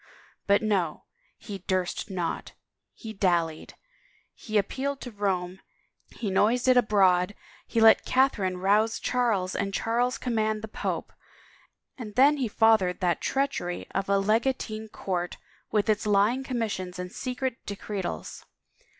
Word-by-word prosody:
But 200 +2 +4
no, 190 -7 0 0.3
he 200 -2 -8
' - - -43
durst 185 +1 -1
not,' 180 -3 -3 0.4
he 220 -1 -8
dallied, 170 -5 0 0.6
he 215 -1 -3
appealed 270 +7 -1
to 245 - -7
Rome, 190 -3 -2 0.6
he 210 -4 -3
noised 230 +6 +2
it 255 - +6
abroad, 195 -5 +3 0.3
he 230 - 0
let 225 0 +7
Catherine 210 -9 +1
rouse 210 +4 +2
Charles 220 -7 0
and 195 -1 -2
Charles 245 +2 0
command 220 -3 -1
the - - -4
pope, - - -4 0.9
and 210 -4 -7
then 280 +4 +5
he 260 -4 0
fathered 215 -4 +3
that 175 -2 +1
treachery 270 -11 -1
of 195 0 -2
a 200 - +4
legatine 220 +1 0
court 180 -4 -3 0.3
with 210 -2 +1
its 215 0 +1
lying 210 +6 +3
commissions 215 -8 -3
and 180 0 -5
secret 255 -1 -4
decretals. 195 - -5
210 Hz, 135 wpm, -27 LUFS, 185-235 Hz, 0.9 s, let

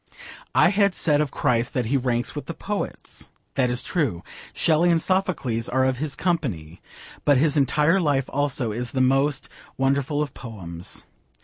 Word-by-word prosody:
I - - +6
had 200 -1 +2
said 150 -3 +3
of 150 - -1
Christ 125 -4 0
that 125 -3 0
he 125 +5 0
ranks 125 -2 0
with 145 - -6
the 170 - -5
poets. 205 0 -5 0.2
That 125 -2 +1
is 125 0 0
true. 130 - -1 0.3
Shelley 165 +2 +3
and 170 -1 +4
Sophocles 160 -11 0
are 130 +1 +2
of 130 -1 0
his 150 -1 -2
company. 110 - -2 0.4
But 145 -2 +4
his 150 +2 +2
entire 150 +5 +3
life 145 -6 +1
also 140 -4 0
is 120 +2 -4
the 135 - -1
most 135 +2 +2 0.3
wonderful 140 +2 +1
of 150 -3 -2
poems. 90 -8 -6
135 Hz, 170 wpm, -24 LUFS, 125-155 Hz, 0.4 s, I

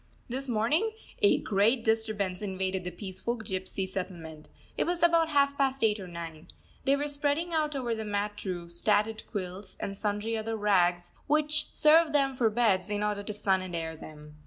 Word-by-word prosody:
This 265 +3 -3
morning 290 - +1 0.3
a 410 - +5
great 220 +4 +2
disturbance 215 -4 0
invaded 190 -2 -2
the - - -1
peaceful 190 +6 -4
gypsy 190 -2 -4
settlement. 170 -5 -6 0.3
It - - +1
was 345 0 -1
about 335 -1 +4
half 280 -2 +3
past 270 -2 +1
eight 215 -1 +3
or 190 - -7
nine. 165 -2 -8 0.4
They 275 - +4
were 290 +1 -1
spreading 290 +4 -1
out 305 -2 +1
over 245 -4 -1
the 220 -1 -3
mat 205 0 -3
roofs 170 -2 -5
tattered 215 +1 +2
quilts 190 -1 -6
and 195 - -4
sundry 210 +2 -1
other 225 0 -2
rags, 180 -4 +2 0.2
which 300 +1 +2
serve 310 0 +5
them 275 -2 +3
for 235 -3 +3
beds, 210 -4 +2
in 205 0 -1
order 210 -1 -1
to 205 - -5
sun 195 -2 +1
and 185 -2 -5
air 160 -1 -3
them. 150 -1 -12
210 Hz, 185 wpm, -29 LUFS, 185-270 Hz, 0.4 s, a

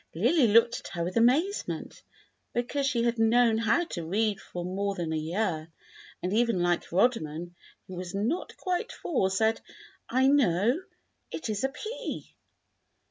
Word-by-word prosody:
Lily 245 - +4
looked 230 +2 +4
at - - -10
her 170 - -1
with 180 +2 -4
amazement, 280 - +1 0.5
because 270 +3 0
she 240 -4 +1
had 235 -1 0
known 225 0 +4
how 230 +10 +2
to 175 - -5
read 205 +5 0
for 175 -1 -6
more 200 +2 -2
than 165 -3 -3
a - - 0
year, 160 0 -2 0.5
and 180 +2 -1
even 230 -5 +2
little 175 0 0
Rodman, 175 -7 +1 0.3
who 185 - -9
was 180 +1 -6
not 230 - -2
quite 370 +6 -2
four, 225 - 0
said, 220 +4 +1 0.5
"I 260 +2 +3
know; 245 - +3 0.5
it 315 - -5
is 210 +1 -2
a 265 - +2
P." 430 - -6
220 Hz, 155 wpm, -28 LUFS, 180-250 Hz, 0.5 s, Lily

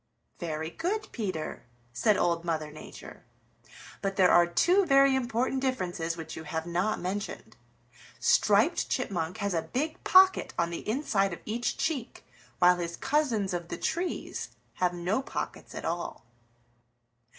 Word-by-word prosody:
"Very 160 -2 -3
good, 415 - -3
Peter," 185 -9 -4 0.3
said 200 - +3
Old 170 -1 +1
Mother 155 -3 -2
Nature. 155 - -11 0.8
"But 195 -1 -2
there 185 -2 +5
are 175 0 +6
two 355 - +3
very 275 -4 +5
important 255 +1 0
differences 180 -10 -2
which 165 - -7
you 160 - -7
have 160 +1 -3
not 180 +5 0
mentioned. 195 +4 -5 0.6
Striped - - +3
Chipmunk 180 -8 -2
has 200 -1 -1
a 165 - +1
big 300 - -3
pocket 375 0 +5
on 170 0 +1
the 170 - -5
inside 210 -7 +1
of - - -7
each 230 +2 -2
cheek, 275 -8 -3 0.3
while 180 0 +5
his 170 -1 -4
cousins 240 -10 0
of 175 -1 -3
the - - -5
trees 355 +2 -3 0.3
have 180 -1 +3
no 180 +8 0
pockets - - -6
at - - -5
all." 170 -7 -4
195 Hz, 145 wpm, -29 LUFS, 170-260 Hz, 0.8 s, are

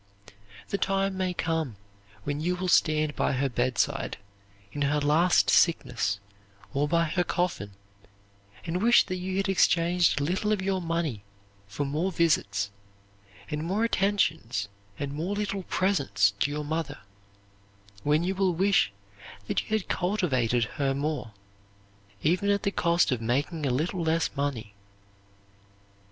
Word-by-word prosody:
The 200 - -1
time 195 0 0
may 185 -1 -1
come 160 -8 -2 0.5
when 145 0 -2
you 180 +3 0
will 185 +1 -3
stand 155 -3 +3
by - - +1
her 135 +1 0
bedside, 130 +3 -1 0.5
in 145 - -5
her 145 +1 +2
last 155 +5 +3
sickness, 120 - +2 0.5
or 145 +1 +1
by 170 +2 +2
her 175 +2 0
coffin, 175 - -2 0.9
and 175 +2 -2
wish 240 +2 +6
that 185 -1 -3
you 185 +1 -3
had 195 +1 0
exchanged 175 -3 +3
a - - -1
little 190 +7 0
of 210 - +1
your 190 0 -1
money 165 - -2 0.5
for 100 +9 -3
more 155 +7 -1
visits 110 - +1 0.8
and 150 0 -2
more 195 +7 0
attentions 160 - 0 0.3
and 140 -1 -4
more 170 +7 -2
little 205 -1 -2
presents 140 - +1
to 145 - +2
your 150 +1 -3
mother; 160 0 -3 1.0
when 150 +5 +2
you 185 +2 0
will 190 -2 +1
wish 190 - +3 0.5
that - - 0
you - - -14
had 220 -3 -1
cultivated 130 - +1
her 135 +4 -1
more, 140 -5 -2 0.9
even 180 +6 +2
at 200 0 +1
the 200 - +1
cost 170 -4 +2
of 125 -3 -1
making 140 +6 -1
a - - +1
little 160 +8 -1
less 160 -1 0
money. 135 -7 -3
160 Hz, 145 wpm, -27 LUFS, 140-185 Hz, 1.0 s, wish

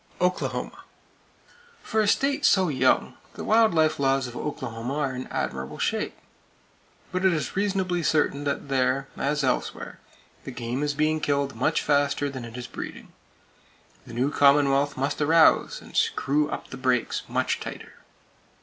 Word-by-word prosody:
Oklahoma: 180 0 -2 1.0
For 220 - 0
a 210 - +1
state 280 +6 +1
so 190 -3 +4
young, 130 -2 +2 0.2
the - - -6
wild 220 -4 +4
life 155 -2 +2
laws 135 -1 +2
of 120 -1 -8
Oklahoma 125 -2 -4
are 140 -4 -1
in 125 - -6
admirable 65 +3 -4
shape; - - -2 0.9
but 185 +1 -2
it 190 - +5
is 155 -4 -2
reasonably 190 -3 0
certain 150 -2 +1
that 140 0 -2
there, 135 0 0
as 145 +1 -1
elsewhere, 130 - -2 0.4
the - - -7
game 125 +1 -4
is 145 -1 -1
being 155 +1 +1
killed 140 -2 0
much 125 +5 +1
faster 145 -1 +1
than 130 -3 -6
it 115 +1 -9
is 125 - -6
breeding. - - -8 0.9
The 115 - -9
new 130 +4 +1
commonwealth 140 0 +3
must 135 +3 -1
arouse, 160 +2 +4
and - - -14
screw 150 +2 +1
up - - -6
the 135 - -6
brakes 130 -2 0
much - - -1
tighter. - - -8
140 Hz, 155 wpm, -25 LUFS, 130-155 Hz, 1.0 s, it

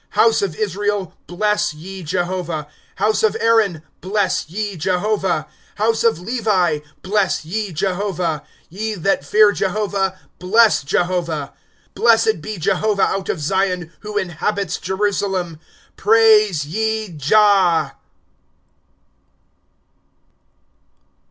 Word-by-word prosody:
^' - - -38
House 225 -1 +4
of 190 -6 -2
Israel, 205 0 -2
bless 210 0 0
ye 190 +5 -9
Jehovah; 175 -2 -3 0.3
House 215 0 +1
of 220 - +2
Aaron, 215 -8 +2 0.2
bless 195 -4 -1
ye 205 +2 -4
Jehovah; 185 0 0 0.3
^^ - - -29
House 225 +2 +1
of 230 -7 +2
Levi, 190 -7 0 0.2
bless 195 -4 0
ye 205 +4 -3
Jehovah; 180 -2 -2 0.3
Te 215 +4 -3
that 185 -4 0
fear 210 +8 +5
Jehovah, 195 -1 -1 0.2
bless 215 +5 +4
Jehovah. 165 -1 -1 0.4
^^ - - -45
Blessed 225 -6 +3
be 215 +5 -6
Jehovah 195 +3 +1
out 195 -1 -3
of 175 - -1
Zion, 180 +1 -1
Who 210 -1 -6
inhabits 195 +2 -2
Jerusalem. 190 -4 -2 0.4
Praise 215 -7 +4
ye 220 +5 -2
Jah. 170 -1 +3
195 Hz, 110 wpm, -19 LUFS, 175-210 Hz, 0.4 s, fear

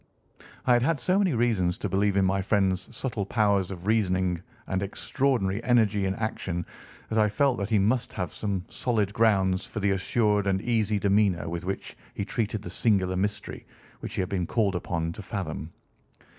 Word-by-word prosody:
I 125 - +5
had 120 - +4
had 150 +3 +1
so 180 +10 +2
many 185 -9 +2
reasons 110 -7 +1
to - - -3
believe 100 0 +1
in 95 - +4
my 95 +1 +1
friend's 95 -1 +1
subtle 115 -6 -2
powers 100 -3 +1
of 90 -2 -7
reasoning 95 -5 +1 0.2
and 95 0 -1
extraordinary 110 0 0
energy 110 -5 +3
in 95 - -1
action 95 -6 -3 0.4
that 110 - +1
I 105 0 +4
felt 135 +2 +1
that 100 0 -2
he 110 - +3
must 120 +5 +1
have 90 -4 -3
some 100 -3 -3
solid 105 -5 -1
grounds 95 -5 +2
for - - -5
the 100 -1 +2
assured 105 +1 +1
and 95 -1 +2
easy 110 -3 +1
demeanour 100 -4 +2
with 85 +1 -4
which 95 +1 -4 0.2
he 100 - -2
treated 110 -2 -2
the 90 - -6
singular 95 -3 +2
mystery 100 +3 -3 0.3
which - - -6
he - - 0
had 90 - -3
been 90 -3 -1
called 105 -5 +1
upon 85 -2 -2
to 85 - -8
fathom. 85 -5 -5
100 Hz, 185 wpm, -27 LUFS, 95-110 Hz, 0.4 s, I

